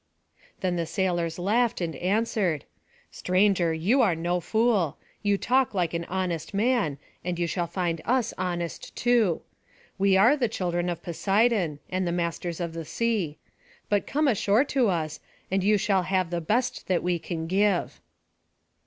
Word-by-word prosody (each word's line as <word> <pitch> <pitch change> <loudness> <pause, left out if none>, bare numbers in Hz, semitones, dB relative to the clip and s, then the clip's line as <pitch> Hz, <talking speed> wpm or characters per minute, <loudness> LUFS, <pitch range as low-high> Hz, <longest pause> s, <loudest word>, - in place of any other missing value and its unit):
Then 180 -2 0
the 165 -1 -1
sailors 170 -1 -1
laughed 220 +6 +1
and 165 -3 -3
answered: 190 -4 0 0.5
"Stranger, 185 -2 +2
you 185 +12 +2
are 195 -8 +3
no 175 +2 -1
fool; 220 -4 +1 0.2
you 205 -1 +2
talk 255 0 +1
like 175 -3 0
an 170 0 -2
honest 180 0 -3
man, 210 - +1 0.3
and 180 -1 -2
you 175 - 0
shall 170 0 -2
find 170 -1 -2
us 250 -1 +1
honest 175 -2 -4
too. 235 -8 +2 0.6
We 195 -1 +4
are 230 +9 +6
the 250 -6 0
children 175 -4 -1
of 175 - -4
Poseidon, 195 -2 +1
and 185 0 -1
the - - 0
masters 170 0 -2
of 170 -2 -3
the 165 0 -5
sea; 200 -5 -1 0.5
but 205 -1 +1
come 300 +1 +1
ashore 215 0 +3
to 255 -6 +3
us, 160 -4 -2 0.3
and 190 0 +1
you 210 +2 +4
shall 195 -1 +2
have 185 -1 0
the 170 -1 -1
best 245 +9 -1
that 185 -2 +1
we 175 -1 0
can 165 -1 -4
give." 195 +1 +1
185 Hz, 160 wpm, -26 LUFS, 170-210 Hz, 0.6 s, are